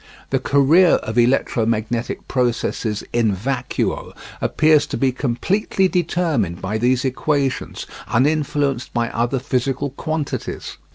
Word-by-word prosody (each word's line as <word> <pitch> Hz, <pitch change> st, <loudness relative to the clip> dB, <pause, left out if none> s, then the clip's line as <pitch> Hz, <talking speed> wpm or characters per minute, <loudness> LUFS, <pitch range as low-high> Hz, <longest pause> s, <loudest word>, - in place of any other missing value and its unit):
The 135 Hz, -, +2 dB
career 145 Hz, +7 st, +4 dB
of 110 Hz, +2 st, -1 dB
electromagnetic 115 Hz, -2 st, 0 dB
processes 115 Hz, -3 st, -1 dB
in 110 Hz, -4 st, +2 dB
vacuo 125 Hz, +5 st, -2 dB, 0.3 s
appears 155 Hz, -2 st, +3 dB
to -, -, -3 dB
be 135 Hz, -1 st, +2 dB
completely 185 Hz, -, 0 dB
determined 165 Hz, -, 0 dB
by 105 Hz, +4 st, -2 dB
these 125 Hz, +3 st, +2 dB
equations, 135 Hz, +1 st, -1 dB, 0.2 s
uninfluenced 140 Hz, 0 st, 0 dB
by 120 Hz, -1 st, +1 dB
other 120 Hz, +4 st, 0 dB
physical 135 Hz, +1 st, -1 dB
quantities. 155 Hz, +1 st, -4 dB
130 Hz, 110 wpm, -20 LUFS, 120-145 Hz, 0.3 s, career